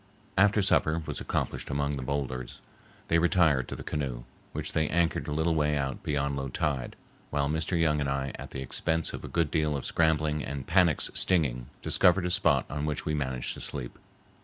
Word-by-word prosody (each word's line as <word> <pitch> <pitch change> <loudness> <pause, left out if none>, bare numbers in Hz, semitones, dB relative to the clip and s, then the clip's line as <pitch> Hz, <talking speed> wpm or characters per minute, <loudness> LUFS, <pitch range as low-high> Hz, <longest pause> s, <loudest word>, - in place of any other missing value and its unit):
After 100 +1 +4
supper 80 -2 +2
was - - -3
accomplished - - -2
among 70 0 0
the 70 -2 -3
boulders, 65 -2 -3 0.5
they 85 - +3
retired 85 -7 +3
to - - -5
the - - -8
canoe, 65 -6 -3 0.3
which - - -4
they 80 -1 +2
anchored 85 +1 +1
a - - -3
little 80 +2 +1
way 75 -1 +2
out, 70 -2 -2
beyond 70 -1 -1
low 70 0 -3
tide, 65 -1 -2 0.3
while 70 -1 0
Mr. 80 +3 0
Young 75 -2 +3
and 70 -2 -1
I 70 0 -1
at - - -8
the 65 - -5
expense 80 +5 -1
of - - -6
a - - -5
good 85 -3 0
deal 75 -3 +1
of 70 - -6
scrambling 80 -2 +1
and 70 -2 -5
panax 85 -3 +3
stinging, 70 -10 +2 0.2
discovered 90 0 +4
a 90 - -1
spot 75 -6 +3
on 75 +1 -3
which 75 - -2
we 75 - 0
managed 65 -4 -2
to - - -9
sleep. 65 -4 -5
75 Hz, 200 wpm, -29 LUFS, 70-80 Hz, 0.5 s, After